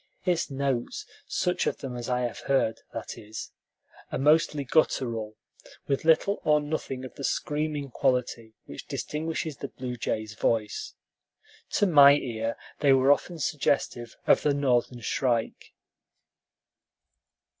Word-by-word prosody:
Its 175 -3 +1
notes 135 -3 -2 0.2
such 180 0 0
of - - -1
them 130 -3 -6
as 120 0 -5
I 125 -1 +1
heard, 120 -2 0
that - - -6
is 110 +1 -8 0.6
are - - -1
mostly 150 0 +3
guttural, 115 -6 0 0.5
with 140 +2 -1
little 165 +5 +3
or 150 0 +4
nothing 145 -3 -4
of 130 - -9
the 140 - -9
screaming 150 -1 -2
quality 120 -4 -1
which - - -9
distinguishes 160 -1 -3
the 140 - -5
blue 125 -2 -6
jay's 110 -2 -3
voice. 110 -1 -1 0.8
To - - +3
my 145 -6 +8
ear 115 -4 -3 0.2
they 140 -2 +5
were 135 +1 +5
often 170 +4 +1
suggestive 135 -5 -1
of - - +5
the 145 -1 +2
Northern 125 -3 +1
shrike. 120 0 -1
135 Hz, 130 wpm, -27 LUFS, 120-150 Hz, 0.8 s, my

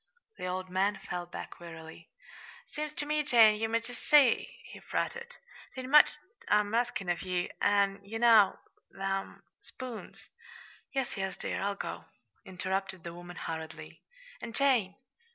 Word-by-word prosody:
The 185 - -3
old 185 +1 -3
man 190 +3 +1
fell 175 0 -5
back 175 - -8
wearily. 165 -1 -11 0.6
"Seems 300 0 -5
ter 300 - -2
me, 300 +1 +1
Jane, 225 -7 +5
ye 225 - +1
might 230 +1 0
jest 245 -1 -8
see," 290 - +5
he - - -11
fretted. 475 +1 -3 0.4
"'T 260 - -4
ain't 255 +1 -7
much 300 0 +7 0.3
I'm 210 0 +2
askin' 235 -5 0
of 175 -1 0
ye, 180 -1 -2
an' 200 -1 +2
ye 210 +3 -6
know 225 -4 +6 0.3
them 195 0 -4 0.2
spoons 255 -3 -9 0.3
" 470 - -21
"Yes, 270 -3 -1
yes, 190 -1 -3
dear, - - -3
I'll 200 0 -1
go," - - -6 0.4
interrupted 190 -1 -3
the 170 - -6
woman 175 0 -10
hurriedly. 160 -1 -7 0.4
"And, 230 -1 -7
Jane!" 245 -9 +3
200 Hz, 155 wpm, -31 LUFS, 185-245 Hz, 0.6 s, much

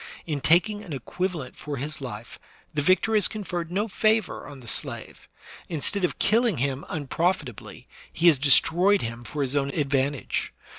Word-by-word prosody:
In 150 -4 -3
taking 205 +8 +3
an 145 -6 -5
equiva 180 +8 -3
lent 140 -6 -7
for 145 -2 -6
his 145 +3 -4
life 120 -4 -8 0.3
the 150 - 0
victor 185 +8 +3
has 210 -3 +7
conferred 175 -5 -5
no 205 +4 0
favor 220 +1 0
on 145 -2 -10
the 120 - -14
slave; - - -4 0.4
instead 175 +5 -2
of 180 - 0
killing 225 - +2
him 135 +2 -2
unprofitably, 155 - -3 0.2
he 165 - -2
has 160 -6 +6
de 145 +1 +2
stroyed 180 +8 +5
him 115 +1 -5
for 145 +3 -3
his 135 +1 -2
own 140 -1 +1
advantage. 140 -1 -1
155 Hz, 175 wpm, -25 LUFS, 140-185 Hz, 0.4 s, has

